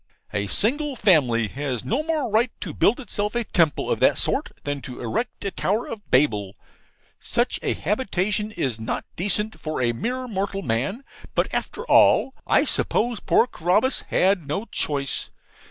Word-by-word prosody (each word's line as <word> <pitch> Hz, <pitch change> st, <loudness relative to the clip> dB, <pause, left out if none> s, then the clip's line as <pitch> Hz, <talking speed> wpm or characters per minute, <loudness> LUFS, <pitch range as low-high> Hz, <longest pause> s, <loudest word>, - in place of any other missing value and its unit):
A 100 Hz, -1 st, -1 dB
single 280 Hz, -, 0 dB
family 140 Hz, -, +3 dB
has 135 Hz, -3 st, -4 dB
no 250 Hz, +7 st, +1 dB
more 310 Hz, -3 st, -1 dB
right 230 Hz, +4 st, +3 dB
to -, -, -5 dB
build 235 Hz, +7 st, +3 dB
itself 210 Hz, -4 st, -2 dB
a 240 Hz, -, +1 dB
temple 165 Hz, -8 st, +1 dB
of -, -, 0 dB
that -, -, +4 dB
sort -, -, +1 dB
than 145 Hz, -1 st, -3 dB
to 125 Hz, -2 st, -8 dB
erect 165 Hz, -, -3 dB
a 200 Hz, -, -1 dB
Tower 210 Hz, +6 st, 0 dB
of 210 Hz, -2 st, -8 dB
Babel. 105 Hz, -8 st, +2 dB, 0.6 s
Such -, -, -1 dB
a -, -, 0 dB
habitation 210 Hz, 0 st, -1 dB
is 130 Hz, -, -2 dB
not 110 Hz, -, -3 dB
decent 210 Hz, +4 st, -1 dB
for 155 Hz, -2 st, -4 dB
a 120 Hz, -2 st, +2 dB
mere 250 Hz, -, -3 dB
mortal 195 Hz, -2 st, -2 dB
man. 135 Hz, -, -1 dB, 0.3 s
But, -, -, +1 dB
after 465 Hz, -, -3 dB
all, 270 Hz, -, +5 dB
I -, -, +4 dB
suppose 235 Hz, -1 st, 0 dB
poor -, -, +3 dB
Carabas 210 Hz, +5 st, +1 dB
had 185 Hz, -5 st, +2 dB
no 155 Hz, +10 st, -2 dB
choice. 140 Hz, -, -2 dB
195 Hz, 165 wpm, -24 LUFS, 140-230 Hz, 0.6 s, all